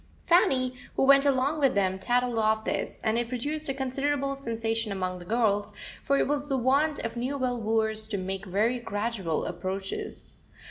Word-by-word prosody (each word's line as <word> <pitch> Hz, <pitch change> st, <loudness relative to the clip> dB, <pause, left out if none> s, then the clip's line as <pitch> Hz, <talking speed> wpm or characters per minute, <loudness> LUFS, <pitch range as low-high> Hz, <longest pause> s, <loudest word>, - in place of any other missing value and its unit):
Fanny, 265 Hz, -8 st, +3 dB, 0.2 s
who -, -, +2 dB
went 275 Hz, +1 st, +6 dB
along 275 Hz, +3 st, +1 dB
with 275 Hz, -6 st, +3 dB
them, 190 Hz, -1 st, +1 dB
tattled 245 Hz, +3 st, +1 dB
of 220 Hz, 0 st, +2 dB
this, -, -, -2 dB
and 225 Hz, +1 st, +1 dB
it 240 Hz, -1 st, -2 dB
produced 290 Hz, +5 st, -2 dB
a -, -, +1 dB
considerable 275 Hz, +1 st, -1 dB
sensation 225 Hz, -4 st, -2 dB
among 185 Hz, -2 st, -3 dB
the 175 Hz, -, -11 dB
girls, 210 Hz, -1 st, +1 dB, 0.3 s
for 280 Hz, -, +2 dB
it -, -, +2 dB
was 290 Hz, +1 st, -1 dB
the 270 Hz, -, +1 dB
wont 280 Hz, +5 st, +2 dB
of 230 Hz, -, -4 dB
Newville 250 Hz, -1 st, -1 dB
wooers 220 Hz, 0 st, 0 dB
to 215 Hz, -2 st, -2 dB
make 190 Hz, +1 st, -4 dB
very 220 Hz, +7 st, +1 dB
gradual 205 Hz, -7 st, -2 dB
approaches. 190 Hz, +1 st, -5 dB
235 Hz, 175 wpm, -28 LUFS, 210-275 Hz, 0.3 s, went